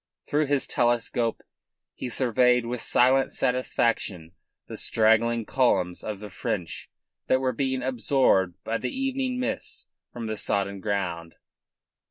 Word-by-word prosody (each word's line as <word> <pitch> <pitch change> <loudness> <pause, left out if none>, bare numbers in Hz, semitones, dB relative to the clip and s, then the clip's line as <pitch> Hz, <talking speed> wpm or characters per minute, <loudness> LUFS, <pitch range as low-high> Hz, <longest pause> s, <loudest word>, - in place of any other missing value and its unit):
Through 150 0 +1
his 140 -1 +2
telescope 120 -1 0 0.5
he 125 - -5
surveyed 125 0 +2
with 120 0 -3
silent 130 +2 +3
satisfaction 115 -9 0 0.3
the - - -8
straggling 115 +1 +2
columns 100 -10 +1
of 105 -2 -5
the 105 -1 -9
French 90 -2 -4 0.4
that 130 - +3
were 130 -1 0
being 130 +1 -1
absorbed 120 -7 +2
by 115 +1 -2
the 125 - -2
evening 265 -1 -2
mists 275 +13 -3 0.3
from 120 -2 -6
the 110 -1 -3
sodden 100 -1 -1
ground. 90 -5 -3
120 Hz, 130 wpm, -26 LUFS, 105-130 Hz, 0.5 s, silent